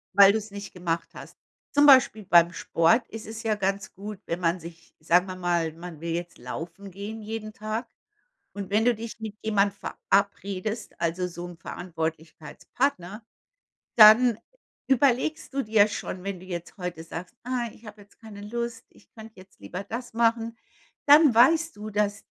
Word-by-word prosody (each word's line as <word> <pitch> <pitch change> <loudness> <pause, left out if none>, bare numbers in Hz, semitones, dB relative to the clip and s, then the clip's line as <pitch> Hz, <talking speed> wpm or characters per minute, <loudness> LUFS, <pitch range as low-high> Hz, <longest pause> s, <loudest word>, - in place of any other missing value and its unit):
Weil 200 0 +8
du's 215 -1 -3
nicht 200 0 -8
gemacht 170 -2 -3
hast. - - -12 0.3
Zum 290 0 +4
Beispiel 260 -6 +6
beim 170 -2 +5
Sport 170 +7 +2
ist 225 -1 -8
es 225 +1 -7
ja 220 -1 +1
ganz 195 -1 -2
gut, 205 +1 -8
wenn 170 - -3
man 175 0 0
sich 165 0 -13
sagen 175 +4 +3
wir 185 - -6
mal, 175 -3 0
man 165 -1 -10
will 170 0 -3
jetzt 175 +1 -5
laufen 165 +10 -8
gehen 205 +4 -7
jeden 215 0 -6
Tag. 215 +3 -4 0.7
Und 200 -1 -7
wenn 215 +2 +2
du 245 -1 +4
dich 225 0 -8
mit 220 -2 -6
jemand 200 -2 +2
verabredest, 200 +2 -2
also 170 +2 -1
so 175 0 -7
'n 175 -1 -11
Verantwortlichkeitspartner, 165 - -4 0.7
dann 225 +1 +8 0.5
überlegst 270 +3 +1
du 275 - 0
dir 215 -2 +4
schon, 185 -3 -6
wenn 195 -2 -4
du 185 - -13
jetzt 175 -2 -7
heute 180 -3 -5
sagst: 175 +7 -8
„Ah, 245 -1 -2
ich 230 - -17
habe 210 0 -11
jetzt 200 - -24
keine 215 -3 -11
Lust, 235 +2 -5
ich - - -23
könnte 220 0 -12
jetzt 190 +1 -19
lieber 185 +2 -7
das 235 +4 -6
machen“, 230 0 +1 0.5
dann 295 -1 +7
weißt 325 +7 +4
du, 215 +1 -7
dass 205 -1 -1
205 Hz, 170 wpm, -26 LUFS, 175-225 Hz, 0.7 s, Weil